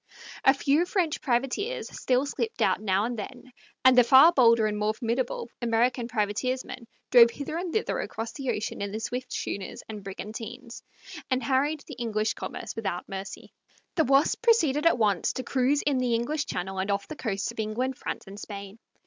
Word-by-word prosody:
A 270 Hz, -, +6 dB
few 290 Hz, +5 st, +2 dB
French 360 Hz, -5 st, 0 dB
privateers 270 Hz, -, -1 dB
still 255 Hz, +2 st, 0 dB
slipped 445 Hz, +10 st, -2 dB
out -, -, +2 dB
now 195 Hz, 0 st, +1 dB
and 240 Hz, -1 st, -3 dB
then, 255 Hz, +4 st, -8 dB, 0.3 s
and 260 Hz, -1 st, +8 dB
the 250 Hz, -, +8 dB
far 270 Hz, +7 st, +8 dB
bolder 230 Hz, -7 st, +5 dB
and 210 Hz, -1 st, 0 dB
more 210 Hz, +1 st, 0 dB
formidable 235 Hz, +1 st, -2 dB
American 235 Hz, +1 st, +1 dB
privateersmen 240 Hz, +2 st, -2 dB, 0.2 s
drove 235 Hz, -2 st, +8 dB
hither 285 Hz, +5 st, -6 dB
and 350 Hz, 0 st, -3 dB
thither 440 Hz, +4 st, -1 dB
across 225 Hz, -, -4 dB
the 270 Hz, -3 st, -4 dB
ocean 210 Hz, -2 st, -3 dB
in 200 Hz, -, -2 dB
their 215 Hz, +2 st, -4 dB
swift 250 Hz, +3 st, -4 dB
schooners 195 Hz, -1 st, -4 dB
and 215 Hz, -2 st, -7 dB
brigantines, 225 Hz, +5 st, -7 dB, 0.5 s
and 255 Hz, -1 st, 0 dB
harried 280 Hz, +4 st, +1 dB
the -, -, -10 dB
English 220 Hz, -2 st, 0 dB
commerce 215 Hz, -, -6 dB
without 195 Hz, -5 st, -3 dB
mercy. 195 Hz, 0 st, -7 dB, 0.4 s
The 320 Hz, -, +2 dB
Wasp 275 Hz, +3 st, +3 dB
proceeded 335 Hz, -, +3 dB
at 335 Hz, -, +4 dB
once 205 Hz, -6 st, +1 dB
to 255 Hz, -, -4 dB
cruise 265 Hz, +3 st, +1 dB
in 280 Hz, -3 st, +1 dB
the 245 Hz, -2 st, +1 dB
English 290 Hz, +6 st, -1 dB
Channel 190 Hz, +1 st, -4 dB
and 190 Hz, +2 st, -2 dB
off 200 Hz, 0 st, -1 dB
the 310 Hz, -, -7 dB
coasts 215 Hz, -4 st, -2 dB
of 235 Hz, -, -12 dB
England, 235 Hz, +5 st, -1 dB
France, -, -, -5 dB
and 200 Hz, +1 st, -10 dB
Spain. 200 Hz, 0 st, -8 dB
240 Hz, 185 wpm, -27 LUFS, 215-275 Hz, 0.5 s, and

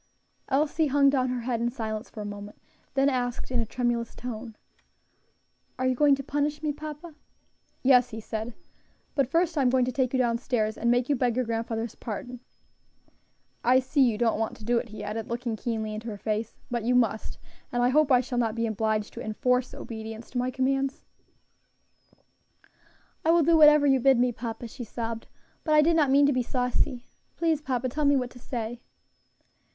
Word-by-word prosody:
Elsie 305 Hz, +3 st, +2 dB
hung 280 Hz, 0 st, +4 dB
down 255 Hz, -2 st, +1 dB
her 250 Hz, -1 st, -2 dB
head 235 Hz, -1 st, -2 dB
in 240 Hz, -, +1 dB
silence 220 Hz, -2 st, -5 dB
for 215 Hz, -, -8 dB
a -, -, -5 dB
moment, 205 Hz, 0 st, -8 dB, 0.4 s
then 270 Hz, 0 st, +4 dB
asked 250 Hz, -2 st, -1 dB
in 250 Hz, -, +1 dB
a 230 Hz, -, -1 dB
tremulous 240 Hz, -1 st, -1 dB
tone, 230 Hz, -2 st, -6 dB, 1.2 s
"Are 255 Hz, -, -1 dB
you 255 Hz, -, +3 dB
going 285 Hz, +2 st, +4 dB
to 275 Hz, -, -6 dB
punish 295 Hz, +2 st, -1 dB
me, 300 Hz, -1 st, 0 dB
papa?" 305 Hz, +2 st, -8 dB, 0.7 s
"Yes," 250 Hz, -2 st, +5 dB
he 225 Hz, -2 st, -6 dB
said, 220 Hz, +1 st, -5 dB, 0.6 s
"but 275 Hz, -3 st, +1 dB
first 330 Hz, 0 st, +1 dB
I -, -, +3 dB
am 255 Hz, -, +4 dB
going 255 Hz, 0 st, +3 dB
to 255 Hz, -, -2 dB
take 255 Hz, 0 st, 0 dB
you 265 Hz, -, +1 dB
down 235 Hz, -2 st, +1 dB
stairs 220 Hz, -4 st, -1 dB
and 235 Hz, -, 0 dB
make 245 Hz, +1 st, +2 dB
you 290 Hz, -, +2 dB
beg 245 Hz, -2 st, +1 dB
your 255 Hz, 0 st, 0 dB
grandfather's 225 Hz, 0 st, -3 dB
pardon. 245 Hz, +3 st, -6 dB, 1.2 s
I 255 Hz, +2 st, +5 dB
see 260 Hz, +3 st, 0 dB
you 235 Hz, -5 st, +4 dB
don't 225 Hz, -2 st, +1 dB
want 225 Hz, -, -2 dB
to 215 Hz, -, -12 dB
do 240 Hz, +1 st, +2 dB
it," 235 Hz, -, -7 dB
he 210 Hz, -1 st, -8 dB
added, 215 Hz, +1 st, -4 dB
looking 235 Hz, -1 st, -2 dB
keenly 220 Hz, -1 st, -3 dB
into 215 Hz, +2 st, -6 dB
her 210 Hz, -3 st, -5 dB
face, 215 Hz, +1 st, -3 dB, 0.2 s
"but 240 Hz, -1 st, -1 dB
you 245 Hz, +2 st, +2 dB
must, 225 Hz, -3 st, +1 dB, 0.3 s
and 245 Hz, 0 st, +1 dB
I 245 Hz, -, +4 dB
hope 295 Hz, +1 st, +3 dB
I 250 Hz, -1 st, +6 dB
shall 250 Hz, -1 st, -3 dB
not 225 Hz, -2 st, 0 dB
be 230 Hz, 0 st, 0 dB
obliged 220 Hz, -1 st, -1 dB
to -, -, -7 dB
enforce 250 Hz, +4 st, 0 dB
obedience 220 Hz, 0 st, -8 dB
to 250 Hz, -, -2 dB
my 250 Hz, +1 st, 0 dB
commands." 270 Hz, +1 st, -1 dB, 2.2 s
"I 320 Hz, -, +1 dB
will 335 Hz, 0 st, +5 dB
do 330 Hz, +2 st, +4 dB
whatever 300 Hz, -2 st, +7 dB
you 270 Hz, -2 st, +4 dB
bid 265 Hz, +1 st, +5 dB
me, 245 Hz, +1 st, +3 dB
papa," 230 Hz, 0 st, -6 dB
she 240 Hz, -, -8 dB
sobbed, 230 Hz, 0 st, -5 dB, 0.4 s
"but 310 Hz, -2 st, +2 dB
I 300 Hz, -, +7 dB
did 335 Hz, +2 st, +3 dB
not 300 Hz, -4 st, +3 dB
mean 280 Hz, +1 st, +5 dB
to 285 Hz, -, +3 dB
be 255 Hz, -, +1 dB
saucy. 250 Hz, 0 st, -1 dB, 0.3 s
Please, 325 Hz, -3 st, +1 dB
papa, 255 Hz, -3 st, -1 dB
tell 295 Hz, +4 st, -1 dB
me 285 Hz, 0 st, +5 dB
what 250 Hz, -2 st, -1 dB
to 245 Hz, -, -13 dB
say." 235 Hz, -1 st, -5 dB
245 Hz, 200 wpm, -27 LUFS, 230-275 Hz, 2.2 s, whatever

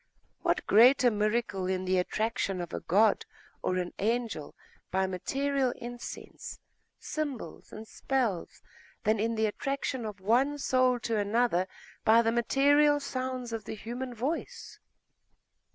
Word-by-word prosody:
What -, -, 0 dB
greater 245 Hz, +3 st, +6 dB
miracle 210 Hz, -2 st, 0 dB
in 185 Hz, 0 st, -1 dB
the 185 Hz, 0 st, +2 dB
attraction 200 Hz, 0 st, -1 dB
of 175 Hz, -1 st, -5 dB
a -, -, -2 dB
god 205 Hz, +4 st, +3 dB, 0.4 s
or 185 Hz, -, 0 dB
an 180 Hz, -1 st, -3 dB
angel, 225 Hz, -7 st, -1 dB, 0.3 s
by 190 Hz, +1 st, +1 dB
material 270 Hz, +8 st, -1 dB
incense, 240 Hz, 0 st, -8 dB, 0.4 s
symbols, 290 Hz, -6 st, -5 dB
and 220 Hz, +1 st, -9 dB
spells, 235 Hz, -11 st, -2 dB, 0.4 s
than 215 Hz, 0 st, +2 dB
in 225 Hz, +2 st, 0 dB
the 220 Hz, 0 st, +2 dB
attraction 260 Hz, +3 st, -2 dB
of 210 Hz, -2 st, -7 dB
one 250 Hz, +9 st, +2 dB
soul 255 Hz, -2 st, +2 dB
to 225 Hz, -1 st, 0 dB
another 205 Hz, -3 st, +1 dB, 0.4 s
by 230 Hz, +2 st, +6 dB
the 225 Hz, -, +2 dB
material 285 Hz, +5 st, +4 dB
sounds 255 Hz, -3 st, -4 dB
of 225 Hz, -, -4 dB
the -, -, -5 dB
human 245 Hz, +4 st, -6 dB
voice? 275 Hz, +9 st, -4 dB
230 Hz, 135 wpm, -29 LUFS, 205-255 Hz, 0.4 s, greater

